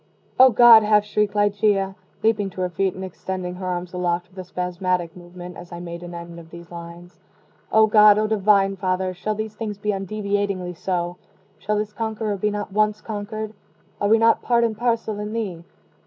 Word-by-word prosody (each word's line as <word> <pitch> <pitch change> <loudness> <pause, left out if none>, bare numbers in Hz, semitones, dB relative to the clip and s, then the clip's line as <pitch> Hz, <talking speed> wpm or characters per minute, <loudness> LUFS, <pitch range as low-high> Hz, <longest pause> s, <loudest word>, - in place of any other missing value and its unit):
"O 260 0 +9
God!" 235 -1 +8
half 210 -1 +3
shrieked 210 0 0
Ligeia, 205 -1 +2 0.3
leaping 210 -3 +2
to 185 - -7
her 180 -1 -1
feet 190 +2 -1
and 190 0 -5
extending 185 0 -5
her 185 0 -6
arms 180 0 -4
aloft 180 -1 -1
with 190 0 -13
a - - -4
spasmodic 180 -1 -2
movement, 180 0 -10
as 175 0 -11
I 175 - -7
made 170 -1 -7
an 175 0 -8
end 170 0 -8
of 165 -1 -14
these 170 0 -12
lines 170 +1 -10 0.5
"O 220 0 +6
God! 210 -1 +6
O 215 - +2
Divine 200 -2 +3
Father! 185 0 -1
shall 215 +4 -3
these 215 0 -4
things 210 -1 -5
be 210 +1 -1
undeviatingly 200 -2 -2
so? 175 0 -3 0.4
shall 210 +1 -1
this 210 0 -3
conqueror 220 -1 -2
be 210 +2 0
not 205 -1 -5
once 210 0 +2
conquered? 215 0 -5 0.5
Are 205 - +2
we 225 - +6
not 225 0 +4
part 235 -1 +2
and 225 -2 0
parcel 225 -2 -1
in 210 +1 -5
Thee? 195 -7 -4
200 Hz, 195 wpm, -22 LUFS, 180-215 Hz, 0.5 s, O